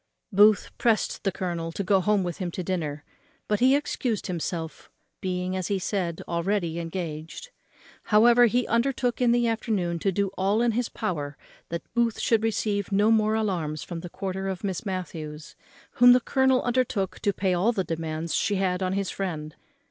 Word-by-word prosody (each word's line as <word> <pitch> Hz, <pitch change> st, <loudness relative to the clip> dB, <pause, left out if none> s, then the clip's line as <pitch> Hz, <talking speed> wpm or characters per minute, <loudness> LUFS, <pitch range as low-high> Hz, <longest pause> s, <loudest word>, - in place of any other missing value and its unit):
Booth 205 Hz, +1 st, +5 dB
pressed 225 Hz, -3 st, +1 dB
the 195 Hz, -, +1 dB
colonel 170 Hz, -3 st, -3 dB
to 200 Hz, -, -3 dB
go 195 Hz, 0 st, +3 dB
home 205 Hz, +1 st, +2 dB
with 175 Hz, -2 st, -4 dB
him 180 Hz, -2 st, -2 dB
to 180 Hz, +1 st, -5 dB
dinner; 155 Hz, -5 st, -3 dB, 0.4 s
but 210 Hz, -1 st, +1 dB
he 260 Hz, +2 st, +5 dB
excused 250 Hz, -6 st, -2 dB
himself, 165 Hz, -2 st, -4 dB, 0.3 s
being, 180 Hz, 0 st, -2 dB
as 185 Hz, -2 st, -2 dB
he 200 Hz, -, 0 dB
said, 180 Hz, -3 st, -2 dB
already 170 Hz, -1 st, -1 dB
engaged. 165 Hz, -, -6 dB, 0.5 s
However, 235 Hz, +3 st, +6 dB
he 245 Hz, +2 st, +1 dB
undertook 245 Hz, +1 st, 0 dB
in 245 Hz, -1 st, +4 dB
the 240 Hz, 0 st, +3 dB
afternoon 205 Hz, -7 st, -1 dB
to 195 Hz, -, +1 dB
do 200 Hz, +1 st, 0 dB
all 195 Hz, +4 st, +1 dB
in 240 Hz, -, +3 dB
his 235 Hz, +1 st, -1 dB
power 150 Hz, -9 st, -4 dB, 0.3 s
that 170 Hz, 0 st, -4 dB
Booth 235 Hz, -1 st, +1 dB
should 225 Hz, -2 st, +2 dB
receive 210 Hz, -2 st, -1 dB
no 205 Hz, +3 st, +4 dB
more 215 Hz, -1 st, +3 dB
alarms 175 Hz, -9 st, -1 dB
from 170 Hz, -2 st, -6 dB
the 175 Hz, +1 st, -8 dB
quarter 190 Hz, +1 st, -4 dB
of 190 Hz, -1 st, -4 dB
Miss 195 Hz, +1 st, -3 dB
Matthews, 160 Hz, -5 st, -6 dB, 0.4 s
whom 245 Hz, 0 st, +7 dB
the 250 Hz, -, +5 dB
colonel 265 Hz, +1 st, +2 dB
undertook 240 Hz, -6 st, 0 dB
to 205 Hz, -, +1 dB
pay 190 Hz, -1 st, 0 dB
all 185 Hz, +7 st, +2 dB
the 195 Hz, -5 st, -1 dB
demands 160 Hz, -1 st, -3 dB
she 205 Hz, -, +1 dB
had 185 Hz, -1 st, 0 dB
on 185 Hz, 0 st, 0 dB
his 195 Hz, -1 st, -1 dB
friend. 160 Hz, -5 st, -4 dB
195 Hz, 180 wpm, -26 LUFS, 175-220 Hz, 0.5 s, whom